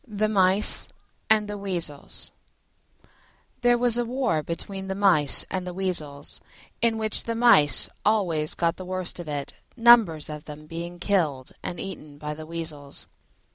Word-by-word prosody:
THE 215 -1 -1
MICE 195 0 +5 0.4
AND 215 -1 +3
THE 205 0 -6
WEASELS 170 -7 -2 1.3
There 245 0 +3
was 240 -1 +3
war 240 -8 -1
between 190 +5 -6
the 190 - -3
Mice 180 -8 +4
and 185 -1 -3
the 180 - -6
Weasels, 155 -7 -2 0.4
in 230 -1 +2
which 220 -1 -2
the 230 - -3
Mice 225 -12 +5 0.2
always 175 -8 0
got 170 0 -1
the 185 - -8
worst 185 -1 -4
of 175 - -8
it, 145 -2 -5 0.2
numbers 230 -10 +5
of 150 -1 -8
them 150 0 -10
being 170 +2 -7
killed 160 -9 -1
and 175 - -6
eaten 155 -7 -8
by 150 +1 -5
the 155 +1 -10
Weasels. 155 -4 -6
180 Hz, 150 wpm, -25 LUFS, 155-210 Hz, 1.3 s, MICE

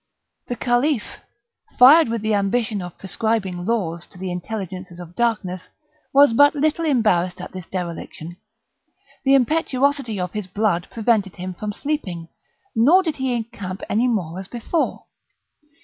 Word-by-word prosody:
The 245 - -3
Caliph, 245 +1 0 0.6
fired 280 +3 +8
with 230 -2 -2
the 215 0 +1
ambition 210 +1 0
of 175 -1 -8
prescribing 195 -3 -2
laws 175 -7 -1
to - - -16
the 185 0 -4
Intelligences 185 -1 -6
of 175 0 -10
Darkness, 210 -6 -1 0.4
was 280 -3 +6
but 285 +5 +5
little 310 +3 +1
embarrassed 185 - +2
at 180 - -7
this 185 -3 -8
dereliction; 175 -2 -6 0.9
the 270 0 +5
impetuosity 275 -4 +1
of 180 -1 -3
his 210 -3 -4
blood 195 -2 0
prevented 220 -4 0
him 185 0 -5
from 210 +4 -4
sleeping, 195 - -4 0.5
nor 300 +12 +5
did 320 -4 -2
he 265 -1 -1
encamp 210 -5 -5
any 230 +4 +2
more 185 -7 -1
as 190 - -8
before. 245 - -2
215 Hz, 145 wpm, -22 LUFS, 180-250 Hz, 0.9 s, fired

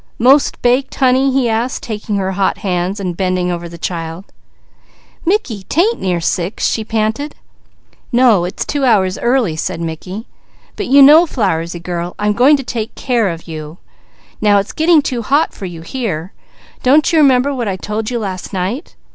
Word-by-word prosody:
"Most 270 +5 +4
baked 250 +2 +1
honey?" 265 +1 +3
he 260 -2 +1
asked, 230 +3 -1
taking 215 -1 -4
her 190 -1 -1
hot 195 0 0
hands. 185 +1 -2
"Mickey, 185 -1 -1 2.2
'tain't 405 +9 +1
near 180 -2 0
six," 175 +3 -2
she 220 - 0
panted. 220 +6 -2 0.8
"No 235 -7 +4
it's 180 - -4
two 285 -1 -2
hours 195 -7 +2
early," 240 -9 +1
said 160 - -3
Mickey. 175 +6 -6 0.5
"But - - -4
you 275 +2 +7
know 310 +5 +7
Flowersy 175 - -1
girl, 175 0 -4
I'm 210 0 +1
going 265 +7 +5
to 275 - -5
take 225 -3 -4
care 235 -6 0
of 165 0 -7
you. 155 0 -7 0.6
It's 205 -1 +2
getting 320 -1 +4
too 245 -3 -2
hot 285 +8 +1
for 195 - -8
you. 165 -2 -9 1.0
Don't 285 +5 +3
you 320 - +5
remember 275 -1 +4
what 245 -4 -3
I 195 - -1
told 215 +3 -4
you 245 - -2
last 190 -5 -5
night?" 195 - -3
220 Hz, 155 wpm, -16 LUFS, 185-260 Hz, 2.2 s, you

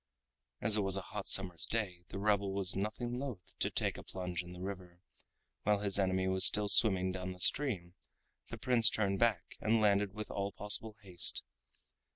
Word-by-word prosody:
As 110 -2 +4
it - - +1
was 95 -1 +2
a - - -3
hot 105 +1 -8
summer's 90 -4 +1
day, 95 -6 -4
the 95 - -8
rebel 100 -1 0
was 95 -2 0
nothing 115 +5 -4
loath 125 -10 -8
to - - 0
take - - -2
a - - -11
plunge 90 -2 -5
in 90 0 -12
the 90 - -11
river, 90 -2 -8 0.6
while 105 -1 0
his 100 -1 +1
enemy 95 -1 0
was 95 0 +2
still 105 +2 +5
swimming 95 -3 +5
down 90 0 -6
the 90 - -16
stream 95 -7 +2 0.6
the - - -7
Prince 120 -2 +4
turned 100 -2 -2
back 110 -7 -1
and 110 +1 +1
landed 100 -2 +1
with 105 0 -7
all 100 0 -4
possible 105 +1 -1
haste. 90 -3 +1
100 Hz, 190 wpm, -33 LUFS, 95-105 Hz, 0.6 s, still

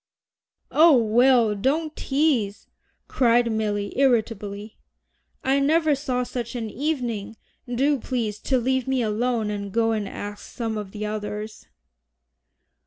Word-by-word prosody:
"Oh, 315 -3 +6
Will, 235 0 +4
don't 295 +9 -1
tease," 270 -8 0 0.4
cried 240 -2 +3
Milly 205 -2 -1
irritably. 215 -5 0 0.6
"I 270 +1 +2
never 310 +2 +3
saw 260 -3 -1
such 240 -1 -5
an 225 -3 -4
evening. 240 -7 -3 0.3
Do 275 +3 +2
please 225 -5 -3
to 260 +3 0
leave 260 +1 0
me 265 -2 +1
alone 225 0 0
and 200 -1 -5
go 225 +2 +2
and 215 -3 -2
ask 205 0 -7
some 225 -2 -3
of 210 -2 -5
the 210 +1 -5
others." 210 0 -5
235 Hz, 125 wpm, -24 LUFS, 210-265 Hz, 0.6 s, Oh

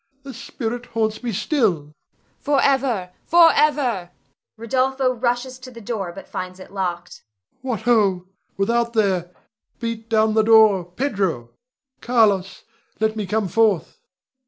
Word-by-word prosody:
The 275 -1 -9
spirit 235 +1 -5
haunts 220 -1 -2
me 240 -2 -3
still! 215 - 0
Voice. 150 +1 -20 0.7
Forever, 250 -11 +1
forever 290 - +3 0.5
Rod. 260 +4 -1 0.2
[rushes 250 +1 -1
to 255 0 -11
the 235 -2 -12
door 205 -5 -4
but 195 - -11
finds 185 0 -6
it 185 - -12
locked]. 175 -3 -4 0.4
What 245 -5 -3
ho! 205 -6 +2 0.3
without 235 +4 0
there! 190 -6 +1 0.5
Beat 230 -1 -5
down 220 -1 +2
the 220 - +4
door! 215 -4 +5
Pedro! 180 - -2 0.5
Carlos! 210 -6 +1 0.4
let 220 0 0
me 210 -3 -4
come 210 +1 0
forth! 210 -1 +1
220 Hz, 130 wpm, -21 LUFS, 190-245 Hz, 0.7 s, door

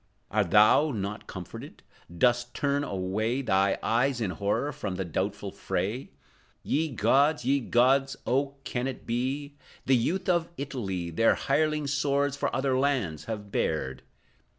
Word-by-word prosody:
Art 105 -4 +1
thou 105 - +6
not 105 -3 -4
comforted? 90 -3 -9 0.3
Dost 120 +4 +2
turn 145 0 0
away 110 +6 -1
Thy 95 -4 +2
eyes, 125 +2 +1
in 105 -6 -1
horror, 100 - -1
from 100 -9 -4
the 95 +1 -3
doubtful 85 - -3
fray? 115 +7 -3 0.5
Ye 160 +2 0
gods, 135 +4 +2
ye 140 +2 +3
gods. 135 +3 +3
Oh, 140 +2 0
can 125 -2 -2
it 130 - -6
be? 135 +5 -2 0.3
The 135 - +4
youth 180 +11 0
of 170 -2 +2
Italy 95 -11 -4
Their 115 +8 +3
hireling 150 +1 +1
swords 140 0 +1
for - - -1
other 130 0 +1
lands 130 - 0
have 105 -3 -6
bared! 65 -5 -1
125 Hz, 145 wpm, -28 LUFS, 105-140 Hz, 0.5 s, thou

